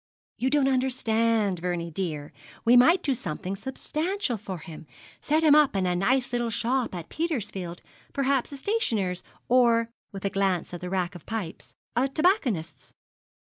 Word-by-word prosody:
'You 260 - +1
don't 280 -1 +3
understand, 230 -6 +1
Vernie 170 -1 -3
dear. 150 -4 -3 0.3
We 235 +2 +6
might 325 +9 +6
do 280 - +2
something 190 -3 -4
substantial 305 - -2
for 195 -3 -6
him 160 -1 -11 0.3
set 310 +2 +1
him 305 -2 +7
up 300 -6 +5
in 190 -1 +1
a 180 0 +1
nice 245 +7 +1
little 240 -1 0
shop 235 0 0
at 170 -2 -6
Petersfield, 210 - -3 0.3
perhaps 275 -2 0
a 280 - -7
stationer's, 225 - 0 0.3
or,' 235 -2 +4 0.2
with 195 0 -7
a 200 - 0
glance 190 -4 0
at 175 - -6
the 180 - -4
rack 185 -2 -1
of 175 - -12
pipes, 215 -7 -5 0.2
'a 250 +3 +3
tobacconist's.' 270 - 0
230 Hz, 160 wpm, -27 LUFS, 180-265 Hz, 0.3 s, him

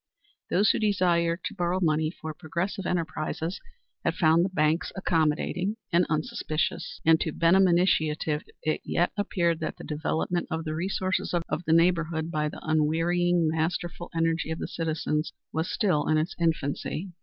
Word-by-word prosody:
Those 200 +4 +4
who - - -1
desired 175 -5 +2
to 230 - -3
borrow 180 -1 0
money 155 -3 +2
for 160 -2 -7
progressive 180 +4 -3
enterprises 165 +1 -2 0.4
had - - 0
found 165 0 +4
the 190 - 0
banks 155 -1 +1
accommodating 175 +3 0 0.2
and 175 +1 +4
unsuspicious, 155 0 -2
and 160 0 +5
to 160 - -1
Benham 185 +5 +4
initiative 160 -4 +2 0.2
it 155 - 0
yet 175 - +1
appeared 175 -5 0
that 160 - -4
the - - -10
development 160 +3 -1
of 160 0 -2
the 155 -1 -3
resources 185 +2 -1
of 170 0 -2
the 160 - +3
neighborhood 165 -1 +2
by 150 -2 0
the - - -10
unwearying, 165 +2 +2
masterful 170 +2 -2
energy 165 0 +1
of 160 - -2
the - - -4
citizens 155 -1 -2 0.2
was 160 +2 -1
still 170 -9 +1
in 155 - +3
its 160 +4 -1
infancy. 165 +2 -1
165 Hz, 155 wpm, -27 LUFS, 155-180 Hz, 0.4 s, and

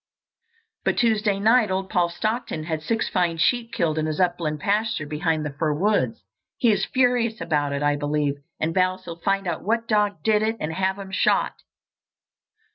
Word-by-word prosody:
But - - 0
Tuesday 215 -4 +2
night 225 +1 +4
old 190 0 -1
Paul 175 -1 +2
Stockton 215 -3 -3
had 160 -1 -3
six 225 +7 -1
fine 175 -3 0
sheep 230 +7 +1
killed 160 -2 0
in 155 - -1
his 155 -1 -3
upland 175 -4 0
pasture 210 -2 0
behind 155 +1 -1
the 145 - -4
fir 150 +1 0
woods. 150 - 0 0.3
He 235 - +4
is 195 -2 +1
furious 245 -3 +1
about 145 -3 0
it, 140 +1 -2
I 145 0 +2
believe, 145 -1 -1 0.2
and 160 +1 -1
vows 185 0 +1
he'll 170 -1 -8
find 195 +1 0
out 170 -3 -2
what 230 +3 0
dog 205 -6 +1
did 215 -1 +3
it 220 +1 0
and 155 +1 -3
have 190 +2 0
him 195 -1 -8
shot." - - +2
185 Hz, 185 wpm, -24 LUFS, 155-215 Hz, 0.3 s, night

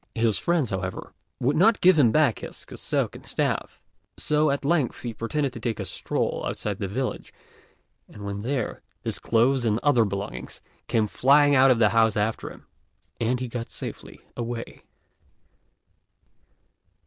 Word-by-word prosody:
His 110 -5 +1
friends, 170 -8 +1
however, 95 -1 -4 0.3
would 135 +4 +1
not 210 +6 +4
give 180 -3 +5
him 120 -6 +5
back 140 -4 +3
his - - -9
cassock - - -2
and - - -11
staff; - - -2 0.4
so 150 0 +2
at 140 0 -1
length 150 -4 +1
he 120 -2 -4
pretended 135 +4 -2
to - - -7
take 115 -3 -3
a - - -3
stroll - - -2
outside 105 -2 -3
the 100 - -2
village, 125 +7 -3 0.8
and 105 -1 -10
when 100 0 -4
there, 125 0 -2 0.2
his - - -3
clothes 120 +3 +2
and 110 -1 +1
other 135 -5 +4
belongings 100 0 -5 0.3
came 110 -2 +2
flying 145 +6 +4
out 135 0 +6
of 125 - +5
the 110 -2 +4
house 110 0 +3
after 105 +2 -1
him, - - -14 0.5
and 120 +2 0
he 130 - -2
got 115 0 -5
safely - - -7
away. 120 -1 -5
120 Hz, 160 wpm, -25 LUFS, 110-140 Hz, 0.8 s, out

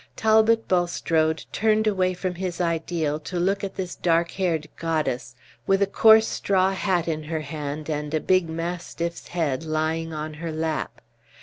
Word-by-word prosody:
Talbot 220 +1 +3
Bulstrode 165 -3 +1
turned 220 0 +2
away 185 -3 +1
from 180 0 -3
his 180 -1 -4
ideal 165 -3 -1
to 175 +4 -4
look 195 +3 0
at 195 - -4
this 185 -2 -4
dark 170 0 +1
haired 165 -5 -1
goddess, 155 -6 -2 0.3
with 195 0 +3
a - - +4
coarse 220 +2 +6
straw 190 -1 +1
hat 185 -3 0
in 155 -2 -2
her 160 0 -3
hand 150 0 -5
and 150 -1 -3
a 155 - +1
big 185 0 +2
mastiff's 170 0 -4
head 160 -5 -1
lying 160 +1 -1
on 155 0 -5
her 165 -1 -3
lap. 160 0 -3
170 Hz, 165 wpm, -24 LUFS, 155-185 Hz, 0.3 s, coarse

